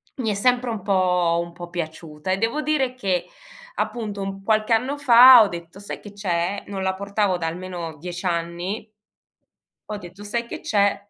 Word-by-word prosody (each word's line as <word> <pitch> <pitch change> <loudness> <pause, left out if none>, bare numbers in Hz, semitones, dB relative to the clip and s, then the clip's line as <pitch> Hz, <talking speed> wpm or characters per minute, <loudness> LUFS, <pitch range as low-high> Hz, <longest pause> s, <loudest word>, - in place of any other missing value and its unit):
mi 230 -5 -1
è - - 0
sempre 245 +4 +1
un 220 -3 -4
po' 180 -3 +2
un 170 - -10
po' 175 0 -9
piaciuta 160 -1 -5
e 190 - +2
devo 230 +8 0
dire 270 -4 0
che, 190 -8 -1 0.5
appunto, 215 - -3
un 195 0 -5
qualche 215 +2 +2
anno 255 +6 +1
fa 250 -3 +9
ho - - +1
detto: 170 0 -8
"Sai 205 - -7
che 205 - -12
c'è?" 190 -1 -2
Non 195 -1 -5
la 190 0 0
portavo 200 -1 0
da 170 - -4
almeno 170 -1 -6
10 175 +4 -7
anni 175 +4 -2 1.0
ho 210 - -3
detto: 185 +1 -11
"Sai 235 +3 -2
che - - -7
c'è: 200 -1 +2
195 Hz, 185 wpm, -23 LUFS, 175-220 Hz, 1.0 s, fa